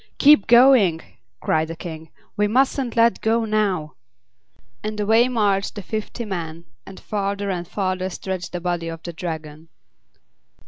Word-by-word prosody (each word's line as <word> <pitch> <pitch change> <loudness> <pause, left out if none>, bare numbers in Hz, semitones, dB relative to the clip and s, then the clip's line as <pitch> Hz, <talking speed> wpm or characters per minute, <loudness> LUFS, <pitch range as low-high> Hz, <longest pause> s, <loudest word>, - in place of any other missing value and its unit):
"Keep 285 -8 +6
going!" 235 -8 +6 0.4
cried 160 0 +1
the 165 - -6
King; 160 -2 -8 0.3
"we 210 0 +2
mustn't 255 +2 +1
let 230 0 +3
go 225 +1 +1
now!" 200 -8 -1 0.9
And 215 0 -4
away 220 +4 +4
marched 205 -5 0
the 205 - -6
fifty 220 +3 -5
men, 170 -4 -5 0.2
and 195 - -10
farther 200 -1 -2
and 175 -2 -4
farther 185 -1 -2
stretched 185 0 -5
the 180 - -4
body 175 -1 -2
of 165 -1 -7
the 170 - -6
Dragon. 160 -2 -7
195 Hz, 145 wpm, -22 LUFS, 170-220 Hz, 0.9 s, Keep